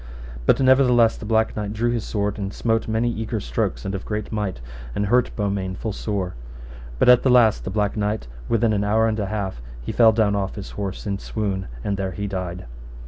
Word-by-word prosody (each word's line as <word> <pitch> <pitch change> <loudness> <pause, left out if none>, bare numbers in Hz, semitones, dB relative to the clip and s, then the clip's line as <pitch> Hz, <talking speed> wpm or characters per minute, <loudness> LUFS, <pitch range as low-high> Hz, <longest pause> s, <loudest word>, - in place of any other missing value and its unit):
But - - +5
nevertheless 130 -3 +5
the 105 - -8
Black 110 0 +2
Knight 105 -1 -3
drew 120 +2 0
his 120 -2 -1
sword, 105 -1 -2
and 100 -1 -3
smote 115 +2 0
many 115 +2 +1
eager 110 -1 -3
strokes, - - -2
and 95 - -2
of 95 - -4
great 105 -1 -4
might, 105 - -2 0.4
and 105 - 0
hurt 125 +4 +3
Beaumains 100 -3 -2
full 110 - -3
sore. 100 -4 -3 0.6
But - - +2
at 125 -1 +8
the 130 - +2
last 120 -4 +4
the - - -2
Black 105 +1 0
Knight, 105 - -1 0.2
within 115 -1 +2
an 100 -1 +1
hour 110 +2 +3
and 110 -1 -1
an 100 - -1
half, 95 - -3 0.2
he - - -3
fell 115 -2 +6
down 110 -2 +2
off 95 -1 -2
his 100 -3 -7
horse 100 -2 -5
in 100 -1 -2
swoon, 100 -4 -3 0.2
and 100 -1 -1
there 95 -1 -2
he 100 +4 -4
died. 90 -4 -4
105 Hz, 215 wpm, -23 LUFS, 100-110 Hz, 0.6 s, at